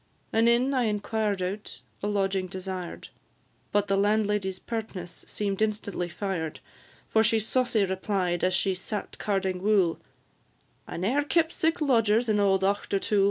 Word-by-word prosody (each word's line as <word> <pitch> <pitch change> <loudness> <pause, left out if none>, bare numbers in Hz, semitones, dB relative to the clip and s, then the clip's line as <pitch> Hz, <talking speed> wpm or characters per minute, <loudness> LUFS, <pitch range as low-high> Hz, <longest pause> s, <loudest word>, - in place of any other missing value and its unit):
An 225 +1 +4
inn 245 +4 +3
I 255 -3 +2
inquired 210 -2 -1
out, 200 +3 -4 0.2
a 205 - -1
lodging 195 -2 0
desired, 185 -1 -6 0.6
But 205 0 +2
the 195 - +2
landlady's 205 -1 +1
pertness 190 -5 -6
seem'd 200 -1 -2
instantly 205 -4 -1
fired; 170 -3 -3 0.5
For 220 - +3
she 225 +1 +4
saucy 225 -1 +2
replied, 190 -2 -1
as 185 0 +3
she 190 0 +1
sat 200 +3 -5
carding 190 -3 -1
wool, 195 -5 +3 0.9
"I - - -6
ne'er 230 +12 +1
kept 320 +3 +2
sic 325 +1 +1
lodgers 230 -4 +3
in 210 -1 +3
auld 195 -1 +3
Auchtertool." 200 +1 +1
205 Hz, 145 wpm, -27 LUFS, 190-220 Hz, 0.9 s, An